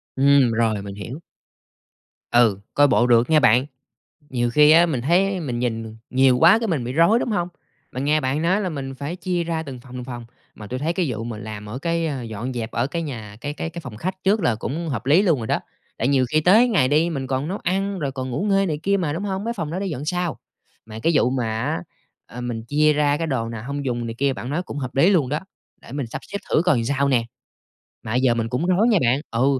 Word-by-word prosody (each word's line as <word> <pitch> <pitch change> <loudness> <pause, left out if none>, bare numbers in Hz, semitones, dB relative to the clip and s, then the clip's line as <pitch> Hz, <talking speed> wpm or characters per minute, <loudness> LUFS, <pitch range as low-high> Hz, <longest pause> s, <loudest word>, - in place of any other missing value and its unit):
Ừm, 140 -2 +4
rồi 110 -3 +1
mình 100 0 -7
hiểu. 115 +8 -7 1.1
Ừ, 115 -5 +4
coi 145 0 +5
bộ 120 -2 +3
được 120 +1 +4
nhe 155 -1 +5
bạn, 120 0 +4 0.7
nhiều 120 -2 0
khi 150 +4 +6
á, 170 +2 +7
mình 140 -7 -1
thấy 185 +6 +2
mình 125 -7 -3
nhìn 115 -2 -3
nhiều 130 -1 +4
quá 175 - +7
cái 230 -2 -2
mình 150 -8 -1
bị 125 - -4
rối, 170 - +4
đúng 240 - -2
hông? 175 -4 0 0.4
Mình 130 +2 -3
nghe 150 +2 +2
bạn 135 +3 -1
nói 185 +5 +2
là 190 - -1
mình 135 -4 -5
phải 145 +6 -5
chia 180 -2 -2
ra 165 -1 -2
từng 135 -5 -8
phòng, 125 0 -15
từng 125 - -5
phòng, 120 -2 -7 0.3
mà 105 - -10
tui 125 +5 -4
thấy 155 +5 -1
cái 175 -1 0
vụ 115 -2 -4
mà 115 -2 -5
làm 105 0 -7
ở 110 +5 -6
cái, 165 +2 -1
ơ, 140 -5 -3
dọn 115 +2 -5
dẹp 115 -2 -4
ở 120 +3 0
cái 165 +4 -3
nhà, 110 -9 -7
cái 145 - -4
cái 165 - -4
cái 170 +1 -7
phòng 125 -8 -9
khách 185 - -5
trước 205 +3 +2
là 120 - +2
cũng 155 +9 -4
hợp 125 -4 -4
lý 160 +7 +5
luôn 170 -8 +2
rồi 115 - -4
đó, - - 0 0.4
tại 120 - +1
nhiều 135 -2 +3
khi 155 - +3
tới 215 +10 +5
ngày 175 - +3
đi 155 +5 +2
mình 135 -5 -3
còn 130 +3 -2
nấu 195 +3 -3
ăn 195 +2 -1
rồi 140 -5 -2
còn 130 -1 -5
ngủ 125 - -2
nghê 195 0 +3
này 155 -4 -2
kia 200 +2 +2
mà, 165 -6 -1
đúng 170 - -4
hông? 195 0 -3
Mấy 235 - -1
phòng 165 -8 -4
đó 170 - -3
để 195 - -2
dọn 145 -5 -4
sau, 175 0 -2 0.5
mà 110 0 -8
cái 165 - +3
vụ 125 - +3
mà 130 -3 -1 0.2
á, 85 - -2 0.4
ờ, 125 - -9
mình 120 -2 -4
chia 150 +4 +3
ra 145 -1 +2
cái 165 - -2
đồ 130 -6 -1
nào 115 -2 -6
hông 140 0 -4
dùng 120 -2 -2
này 115 - -5
kia 140 0 +2
bạn 130 0 -6
nói 165 +5 -1
cũng 145 - -7
hợp 130 -3 -5
lý 140 +8 +5
luôn 160 -10 +2
đó, 150 +3 -1 0.4
để - - -12
mình 140 -2 -3
sắp 115 - -6
xếp 200 - -5
thử 155 - +3
coi 135 -11 +2
sao 140 +3 +1
nè. 120 -4 +2 0.8
Mà 110 - -4
bây 125 - +1
giờ 130 -2 +4
mình 115 -1 -2
cũng 130 +7 -1
rối 185 +6 +3
nha 220 - +4
bạn 125 +2 +2
ừ, 130 +3 +2
140 Hz, 265 wpm, -22 LUFS, 120-170 Hz, 1.1 s, á